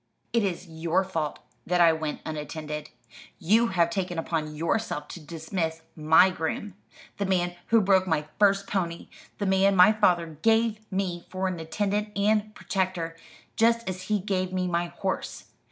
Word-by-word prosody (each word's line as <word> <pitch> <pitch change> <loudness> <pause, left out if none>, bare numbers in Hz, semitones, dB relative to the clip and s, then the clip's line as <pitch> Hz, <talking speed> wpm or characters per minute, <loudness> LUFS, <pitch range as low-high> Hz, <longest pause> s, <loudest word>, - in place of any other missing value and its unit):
"It 230 -2 +3
is 185 -1 -2
your 165 +3 0
fault 165 -6 -3 0.3
that 180 0 +1
I 170 -1 +6
went 160 -1 -4
unattended. 150 0 -5 0.5
You 220 +7 +3
have 170 -4 +2
taken 180 -1 -2
upon 155 -2 -2
yourself 160 -1 -1
to - - -8
dismiss 160 +1 -4
my 160 +4 +5
groom 185 +4 -3 0.4
the 200 - -1
man 175 -2 0
who 230 -1 +5
broke 190 -1 +3
my 155 -3 0
first 200 -1 +4
pony, 170 -4 -3 0.3
the 205 - -2
man 195 +1 +3
my 180 +3 +8
father 175 -7 +1
gave 225 -1 +3
me 185 -3 -2
for 185 +1 -2
an 180 -2 -3
attendant 205 +5 -2
and 215 +1 +1
protector, 180 -4 -2 0.4
just 230 -1 +2
as 185 -1 -3
he 210 - +3
gave 185 -2 -2
me 185 0 -1
my 175 -1 0
horse. 190 +2 -4
185 Hz, 160 wpm, -27 LUFS, 165-200 Hz, 0.5 s, my